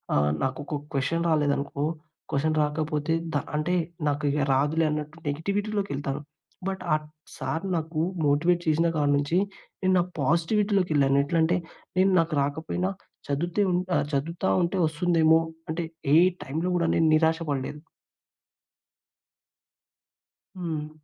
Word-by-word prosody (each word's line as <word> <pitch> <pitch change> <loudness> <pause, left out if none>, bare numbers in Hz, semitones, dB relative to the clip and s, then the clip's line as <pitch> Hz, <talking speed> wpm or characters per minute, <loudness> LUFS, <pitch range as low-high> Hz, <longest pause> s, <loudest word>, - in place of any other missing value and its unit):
ఆహ్, 75 0 +3
నాకు 135 +4 -1
ఒక 150 - -3 0.2
క్వశ్చన్ 140 +5 0
రాలేదనుకో, 145 -2 0 0.5
క్వశ్చన్ 155 +3 +1
రాకపోతే 150 +1 -1 0.2
ద - - -2 0.2
అంటే, 155 +4 +1 0.3
నాకు 145 +1 0 0.3
రాదులే 150 +4 +2
అన్నట్టు 150 +1 -4
నెగటివిటీలోకెళ్తాను. 165 -3 -2 0.5
బట్, 190 -1 -3
ఆ - - +6 0.4
సార్ 165 +4 -3
నాకు 160 -1 -2 0.3
మోటివేట్ 170 +5 +3
చేసిన 160 +2 +3
కాడి 145 -2 +2
నుంచి, 145 +5 0 0.4
నేను 185 -1 +3
నాకు 180 +1 -1
పాజిటివిటీలోకెళ్ళాను. 165 -3 +2
ఎట్లంటే, 165 +3 +2 0.4
నేను 190 +1 +4
నాకు 165 0 0
రాకపోయినా, 160 +6 -1 0.4
చదువుతే 170 +7 0
ఉ - - +1 0.2
ఆహ్, - - +2
చదువుతా 165 +7 -1
ఉంటే 175 +3 -1
వస్తుందేమో, 160 0 +3 0.3
అంటే 165 +1 -2 0.3
ఏ - - +8 0.3
టైమ్‌లో 160 +7 -2
కూడా 170 -1 +2
నేను 165 - +3
నిరాశ 160 +1 +3
పడలేదు. 140 +2 -3 2.8
హ్మ్. 160 -4 -3
160 Hz, 120 wpm, -26 LUFS, 145-175 Hz, 2.8 s, ఏ